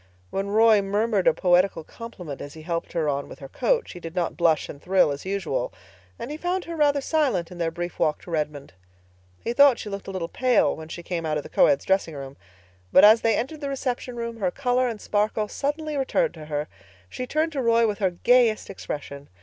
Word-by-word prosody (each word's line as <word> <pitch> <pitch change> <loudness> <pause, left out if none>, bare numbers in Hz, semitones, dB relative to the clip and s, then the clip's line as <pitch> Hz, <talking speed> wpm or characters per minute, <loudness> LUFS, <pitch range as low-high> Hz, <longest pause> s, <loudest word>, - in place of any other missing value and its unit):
When 195 +1 -2
Roy 215 0 +5
murmured 205 0 0
a - - +6
poetical 180 -2 +2
compliment 180 - -9
as 145 +1 -8
he 160 - -11
helped 170 0 -3
her 165 -3 0
on 140 -1 -2
with - - -10
her 135 - -9
coat, 480 - 0
she 175 - -9
did 165 0 -8
not 175 -2 -1
blush 165 -3 +2
and 140 - -10
thrill 185 -5 +3
as 140 +6 -6
usual; 190 -10 -2 0.5
and 265 - -6
he 300 - -5
found 355 +2 -2
her 335 - -6
rather 290 -2 +2
silent 265 - 0
in 175 - -10
their 165 -1 +1
brief 175 +1 -6
walk 150 - +1
to 175 - -10
Redmond. 150 - -3 0.7
He 235 - -1
thought 280 -1 +6
she 210 - -6
looked 200 -1 -6
a - - -4
little 185 -3 -3
pale 250 +6 +2
when 160 0 -9
she 175 - -7
came 170 -1 -3
out 155 -1 -1
of 150 - -4
the - - -10
coeds' 140 - +3
dressing 190 -5 +1
room; 135 -1 -8 0.6
but 185 - +7
as 220 +2 +7
they 225 -2 +3
entered 295 +6 -4
the 280 - -3
reception 255 -2 -3
room 235 -1 -5
her 195 -4 0
color 255 +3 0
and 225 -3 -4
sparkle 210 +1 0
suddenly 300 +5 -3
returned 265 -2 +1
to 155 -2 -10
her. 150 0 -3 0.4
She 250 - -6
turned 315 +4 0
to 280 -4 -2
Roy 230 -1 +4
with 210 -1 -1
her 195 -3 +2
gayest 230 +4 +2
expression. 145 -6 -7
200 Hz, 225 wpm, -25 LUFS, 165-245 Hz, 0.7 s, but